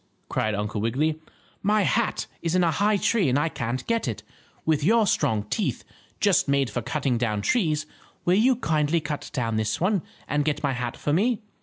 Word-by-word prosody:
cried 110 -1 0
Uncle 105 +1 -2
Wiggily. 150 +8 0 0.4
"My 210 +1 +3
hat 230 +3 +1 0.2
is 165 +1 -1
in 180 - +4
a 165 - +3
high 205 +6 +2
tree 200 - +2
and 130 - +2
I 155 +3 +1
can't 120 -2 -3
get 230 - 0
it. 105 -3 -4 0.4
With 155 -2 +2
your 220 +6 +4
strong 130 - +1
teeth, 105 - -2 0.4
just - - +3
made 140 -4 +1
for 120 - -2
cutting 135 -1 -1
down 105 -4 -1
trees, 155 - +1 0.4
will 175 - +4
you 240 +7 +4
kindly 160 -7 +1
cut 150 -2 -5
down 115 -4 -1
this 110 -1 -1
one, 190 +1 +2 0.3
and 145 0 +1
get 150 0 -1
my 140 -2 +1
hat 125 -1 -4
for 145 - -1
me?" 220 +7 +2
150 Hz, 195 wpm, -25 LUFS, 120-185 Hz, 0.4 s, in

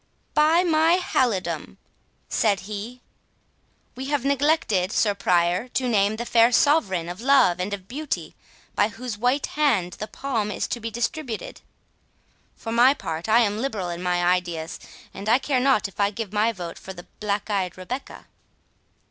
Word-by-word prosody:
"By 315 +4 +4
my 325 0 +4
halidom," 245 - -1 0.5
said 205 -4 +1
he, 215 +5 -7 0.9
"we 260 - -6
have 285 -2 -1
forgotten, 275 - +1
Sir 210 -1 +2
Prior, 180 +2 +1
to 255 +1 -2
name 210 -2 +2
the 235 +2 -4
fair 230 0 +4
Sovereign 215 - +2
of 180 +4 -7
Love 255 -9 +4
and 185 +3 -2
of 195 -2 -6
Beauty, 290 +6 -4 0.4
by 205 - +3
whose 225 0 -7
white 250 +5 +1
hand 230 - +1
the 215 - -4
palm 225 -2 -2
is - - -2
to 240 - -2
be 230 0 -4
distributed. 240 +1 -4 0.9
For 225 - -6
my 245 +4 +5
part, 165 - -5
I 230 +2 +6
am 210 -2 0
liberal 220 -8 -2
in 170 0 -5
my 180 -1 0
ideas, 175 -3 -1 0.3
and 205 +2 -5
I 235 - +6
care 270 -1 0
not 255 -6 +3
if 195 - -18
I 200 0 +3
give 210 -1 -6
my 215 +2 +2
vote 175 -5 -7
for 190 - -9
the 175 -1 -11
black 210 0 -2
eyed 185 -3 -1
Rebecca." 245 +9 -7
220 Hz, 165 wpm, -24 LUFS, 190-260 Hz, 0.9 s, I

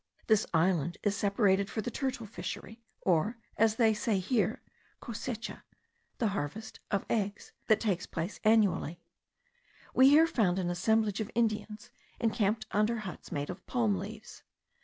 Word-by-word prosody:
This 215 -2 +3
island 170 -1 +2
is 205 -1 +1
celebrated 200 -1 +2
for 220 - -2
the 245 - -4
turtle 260 -4 -3
fishery, 220 +1 -7 0.2
or, 190 +6 +1 0.2
as 220 -1 +3
they 225 -2 +4
say 215 -1 0
here, 210 +5 0 0.4
the - - -14
cosecha, 235 0 -5 0.6
the 225 - +1
harvest 205 +4 -5
[of 200 -2 0
eggs,] 205 -2 -2 0.2
that 215 -1 +5
takes 195 -5 -1
place 165 +5 -4
annually. 210 -6 +3 0.9
We 260 +1 +7
here 305 +3 +7
found 205 - +1
an 175 -2 0
assemblage 215 +3 +1
of 215 - -4
Indians, 215 -1 -1 0.3
encamped 215 -1 +1
under 215 +3 +2
huts 185 - -8
made 145 +3 -2
of 180 +1 -10
palm 230 -5 +1
leaves. 210 +4 -8
210 Hz, 150 wpm, -31 LUFS, 190-225 Hz, 0.9 s, We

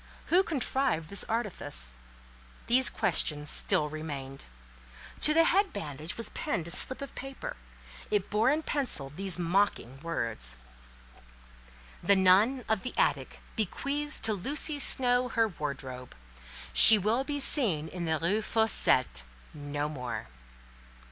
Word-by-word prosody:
Who 365 - +6
contrived 265 - -1
this 200 - -3
artifice? 170 - -4 0.7
These 255 +2 +3
questions 150 -1 0
still 150 - +2
remained. 145 -3 -7 0.7
To 305 - +4
the 330 +2 +4
head 390 +3 +2
bandage 150 +3 -6
was 230 -2 -1
pinned 170 -3 -3
a - - -2
slip 260 - +1
of 280 - -9
paper: 275 - -8 0.5
it 205 -2 -1
bore 215 +4 +2
in 305 +3 0
pencil 250 - -1
these 190 -1 +1
mocking 175 -7 -1
words— 115 - -3 1.4
"The 200 - +4
nun 200 +7 +3
of 220 -3 0
the 255 - -6
attic - - -1
bequeaths 280 - -1
to 220 - 0
Lucy 290 - -2
Snowe 250 -2 +4
her 225 -1 +1
wardrobe. 135 -6 -7 0.6
She 220 - +10
will 215 +6 0
be 285 +1 -4
seen 205 - +3
in 175 +1 -6
the 160 -1 0
Rue 190 +7 0
Fossette 220 - +1 0.3
no 145 0 -4
more." 125 - -6
200 Hz, 130 wpm, -29 LUFS, -, 1.4 s, She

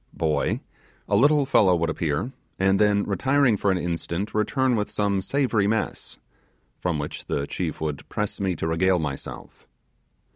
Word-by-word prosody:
(boy), 80 -2 0 0.5
a 100 - +2
little 145 +5 +4
fellow 95 -9 +4
would 85 -1 0
appear, 80 - -2 0.3
and 95 +1 +3
then 105 -1 +3
retiring 130 +5 +2
for 100 - 0
an 95 - +2
instant, 85 +3 -3
return 125 +4 +1
with 105 -2 -1
some 100 -2 0
savoury 115 -2 +1
mess, 110 +1 -2 0.6
from 90 -3 -1
which 75 0 -5
the 70 - -1
chief 80 0 -4
would 75 -3 -4
press 105 -1 -3
me 95 -2 0
to 80 - -4
regale 90 +3 +2
myself. 75 -5 -6
95 Hz, 155 wpm, -25 LUFS, 85-110 Hz, 0.6 s, little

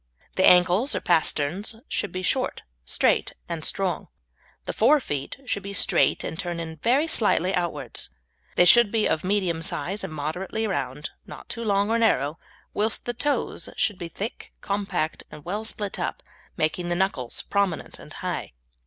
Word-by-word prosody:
The 185 - +5
ankles 180 +8 +4
or - - +1
pasterns 170 +4 +1
should 205 - -2
be 185 0 -4
short, - - 0 0.2
straight, 60 - +1
and 165 -2 -4
strong. 190 +1 -1 0.6
The - - -3
fore 305 - +5
feet 145 - -4
should 200 -5 -1
be 200 +1 -6
straight - - +3
and 160 - -5
turn 170 -2 -4
very 255 - +3
slightly 205 - +3
outwards; 175 - -1 0.5
they 180 - +6
should 210 +4 +7
be 220 -2 +2
of 155 - 0
medium 185 -4 0
size 190 +4 -2
and - - -4
moderately 170 +9 -3
round, 145 -7 -3 0.2
not - - -10
too 235 - -5
long 205 0 +2
or 230 - +3
narrow, 155 - +2 0.3
whilst 215 +2 0
the 240 - -1
toes 290 +4 -1
should 205 -5 +1
be 170 - -4
thick, 210 +6 -6
compact, 195 -6 -2
and 150 -1 -12
well 205 +5 -2
split 210 -2 -4
up, - - -3 0.3
making 175 +3 0
the 175 - +1
knuckles 175 -10 0
prominent 200 -4 -1
and - - -12
high. - - -3
185 Hz, 165 wpm, -25 LUFS, 165-210 Hz, 0.6 s, should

